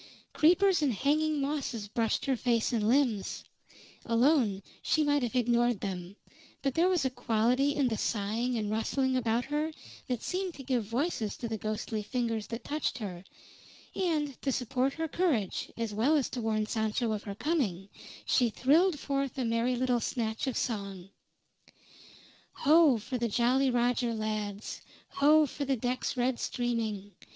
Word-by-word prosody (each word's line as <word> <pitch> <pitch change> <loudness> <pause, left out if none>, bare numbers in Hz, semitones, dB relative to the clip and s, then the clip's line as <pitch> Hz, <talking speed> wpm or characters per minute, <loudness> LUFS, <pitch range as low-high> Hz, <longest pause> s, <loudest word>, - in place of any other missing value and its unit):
Creepers 360 +3 +4
and 285 -3 +2
hanging 300 +6 +1
mosses 275 -7 -2
brushed 225 +1 -1
her 270 - +1
face 235 -1 +1
and 215 -3 +1
limbs; 245 -7 +1 0.6
alone 230 -5 +2 0.2
she 310 - +2
might 290 -1 +2
have 245 0 -2
ignored 240 -2 +2
them; 185 -1 -5 0.5
but 275 -2 0
there 340 +5 +3
was 350 -7 +1
a - - +2
quality 250 +5 +1
in 280 -3 +2
the 225 -3 -1
sighing 230 +4 -1
and 210 -1 -2
rustling 260 +4 0
about 235 -1 +1
her 300 +3 -1 0.4
that 250 -3 -2
seemed 370 -1 -2
to 270 - -9
give 250 -4 0
voices 230 - -2
to 235 - -4
the 225 - -3
ghostly 215 +1 -3
fingers 230 -1 -2
that 230 0 -6
touched 300 +1 -2
her, 190 -6 -6 0.7
and 305 -7 -1
to 275 - 0
support 255 +2 0
her 325 0 -3
courage 285 - -1
as 230 -2 -3
well 245 +9 +3
as 275 - 0
to 250 - -4
warn 215 -1 0
Sancho 220 +2 -1
of 210 -1 -2
her 200 -2 -7
coming, 210 - -1 0.4
she 245 -2 +3
thrilled 310 - +3
forth 275 -2 -2
a 255 - -1
merry 230 +2 +1
little 250 -1 +1
snatch 225 +1 -2
of 260 - -1
song: 200 -5 -4 1.4
"Ho! 310 -3 +5
for 245 +4 -4
the 235 0 0
Jolly 255 +5 +2
Roger 245 -1 +1
lads; 215 -1 -4 0.3
Ho! 305 +2 +5
for 290 0 -5
the 270 -1 0
decks 250 +2 -2
red 245 0 +1
streaming. 225 -5 -2
245 Hz, 160 wpm, -30 LUFS, 220-280 Hz, 1.4 s, Ho